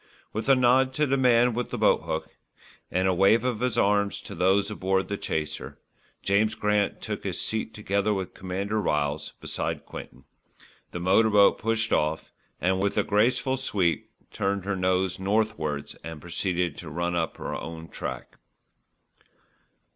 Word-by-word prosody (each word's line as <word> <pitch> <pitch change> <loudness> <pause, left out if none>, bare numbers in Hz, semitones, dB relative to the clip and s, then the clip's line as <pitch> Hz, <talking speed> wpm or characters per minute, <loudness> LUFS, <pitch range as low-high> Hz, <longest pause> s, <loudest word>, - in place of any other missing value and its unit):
With 110 +5 -3
a 135 - +8
nod 130 +1 +3
to 150 - +2
the 135 -1 +1
man 125 -2 +4
with 120 +1 -2
the - - -4
boathook, - - +1 0.6
and 95 +1 +1
a 95 - +3
wave 95 +6 +4
of 125 -4 -1
his 125 -3 0
arm 100 0 +3
to 100 0 -8
those 95 +4 +2
aboard 95 -1 0
the 100 - -1
chaser, 75 -5 -4 0.5
James 105 +3 +2
Grant 105 -2 0
took - - -4
his - - -3
seat 110 0 -2
together 100 0 0
with 95 -3 -2
Commander 100 +4 -2
Ryles 75 -4 -1
beside - - -4
Quinton, - - -10 0.7
the 90 - -6
motor 95 +6 +4
boat 105 -1 +5
pushed 115 0 0
off 75 +1 0 0.3
and, 95 +1 +1
with 100 0 0
a - - +4
graceful 125 +5 +2
sweep, 95 -10 0 0.2
turned 100 -1 -1
her 100 0 -1
nose 95 0 0
northwards 95 -8 -1
and 80 0 -7
proceeded 85 -1 -2
to 85 - -8
run 85 +3 -2
up 85 -2 -1
her - - -5
own 80 +1 -7
track. - - -7
100 Hz, 160 wpm, -26 LUFS, 90-110 Hz, 0.7 s, a